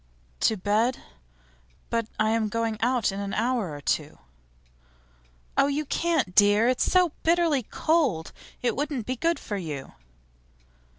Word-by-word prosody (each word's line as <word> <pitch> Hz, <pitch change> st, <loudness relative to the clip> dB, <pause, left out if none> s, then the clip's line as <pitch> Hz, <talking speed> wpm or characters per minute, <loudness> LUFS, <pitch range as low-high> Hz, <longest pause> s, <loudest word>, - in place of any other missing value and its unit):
'To 220 Hz, -, +2 dB
bed? 215 Hz, +6 st, +1 dB, 0.9 s
But 230 Hz, -1 st, 0 dB
I 215 Hz, 0 st, +3 dB
am 225 Hz, -1 st, +1 dB
going 225 Hz, 0 st, -2 dB
out 245 Hz, -2 st, +2 dB
in 195 Hz, -, -5 dB
an 200 Hz, -1 st, -3 dB
hour 230 Hz, -6 st, 0 dB
or 145 Hz, -1 st, -7 dB
two.' -, -, -1 dB, 1.4 s
'Oh, -, -, +4 dB
you 290 Hz, +2 st, -1 dB
can't, 310 Hz, -, 0 dB
dear! 205 Hz, +3 st, +5 dB
It's 255 Hz, 0 st, +1 dB
so 365 Hz, -3 st, +4 dB
bitterly 330 Hz, -4 st, +2 dB
cold. 250 Hz, -, 0 dB, 0.3 s
It 245 Hz, -, +1 dB
wouldn't 285 Hz, -5 st, -2 dB
be 255 Hz, -, -2 dB
good 335 Hz, +6 st, 0 dB
for 205 Hz, -, -5 dB
you. 150 Hz, -7 st, -6 dB
230 Hz, 140 wpm, -26 LUFS, 205-285 Hz, 1.4 s, dear